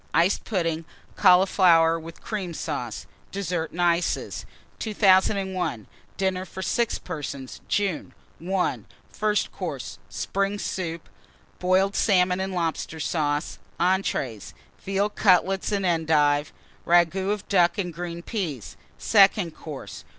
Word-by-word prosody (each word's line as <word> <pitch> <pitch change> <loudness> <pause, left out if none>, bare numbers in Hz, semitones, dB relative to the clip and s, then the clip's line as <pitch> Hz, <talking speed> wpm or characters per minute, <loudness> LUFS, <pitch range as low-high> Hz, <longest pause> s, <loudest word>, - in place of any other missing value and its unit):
Iced 175 +4 +2
Pudding. 165 -6 -1 0.3
Cauliflower 180 -3 +5
with 165 +1 -11
Cream 190 -6 -4
Sauce. 125 -10 -4 0.3
DESSERT 180 -4 -2
AND 175 +1 -2
ICES. 170 0 0 0.3
2001. 190 - +2 0.3
DINNER 190 -1 0
FOR 190 0 -7
6 235 +2 0
PERSONS 140 -6 -7
(June). 200 -5 -1 0.3
I. 185 0 0 0.3
FIRST 210 -1 0
COURSE. - - -6
Spring 195 +1 -1
Soup. 170 -5 -4 0.5
Boiled 190 +2 +2
Salmon 180 -2 +3
and 190 0 -3
Lobster 165 -1 -2
Sauce. 150 -1 -1 0.2
ENTREES. 170 - -1 0.3
Veal 195 +2 0
Cutlets 190 0 +2
and 200 -2 0
Endive. 155 -3 +2 0.4
Ragoût 175 +3 +3
of 210 -2 -3
Duck 175 -3 +3
and 180 -4 -2
Green 170 0 -6
Peas. 165 - -4 0.2
SECOND 195 -5 +4
COURSE. 150 -4 -8
180 Hz, 115 wpm, -25 LUFS, 165-195 Hz, 0.5 s, Cauliflower